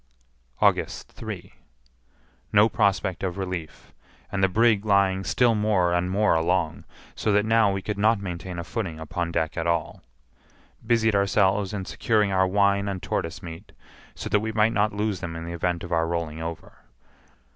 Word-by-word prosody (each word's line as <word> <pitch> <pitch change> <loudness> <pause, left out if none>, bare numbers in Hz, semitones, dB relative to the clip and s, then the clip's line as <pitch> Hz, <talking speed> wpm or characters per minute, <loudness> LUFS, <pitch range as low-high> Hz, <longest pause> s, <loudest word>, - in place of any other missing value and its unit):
August - - +1
3. - - -8 1.0
No 105 +1 +6
prospect 95 -6 0
of 95 -1 -3
relief, 90 -5 -6 0.4
and 95 0 -1
the 95 - +4
brig 110 +1 +3
lying 100 -2 +2
still 120 +3 +3
more 105 -5 +2
and 90 +1 0
more 105 +3 +2
along, 85 0 0 0.3
so 110 - -1
that 105 +1 +3
now 110 -2 +4
we 95 -1 -3
could 105 -1 -4
not 110 +1 +3
maintain 90 -1 -6
a 85 - -3
footing 90 -4 -4
upon 85 +2 -3
deck 80 -1 -1
at - - -2
all. 85 -1 -1 0.8
Busied 110 -1 +2
ourselves 100 0 +2
in 100 -3 -4
securing 105 -2 +1
our 95 0 +3
wine 100 +1 +2
and 95 -2 -4
tortoise 80 +3 -3
meat, 85 +4 -10 0.4
so - - -6
that 105 - +2
we 110 +1 -3
might 110 +1 +2
not 105 -1 +2
lose 105 -2 -2
them 85 -2 -5
in 80 0 -6
the 85 - -5
event 85 0 -2
of 90 - -8
our 80 -1 +1
rolling 80 -2 -3
over. 85 0 -7
95 Hz, 175 wpm, -25 LUFS, 85-105 Hz, 1.0 s, No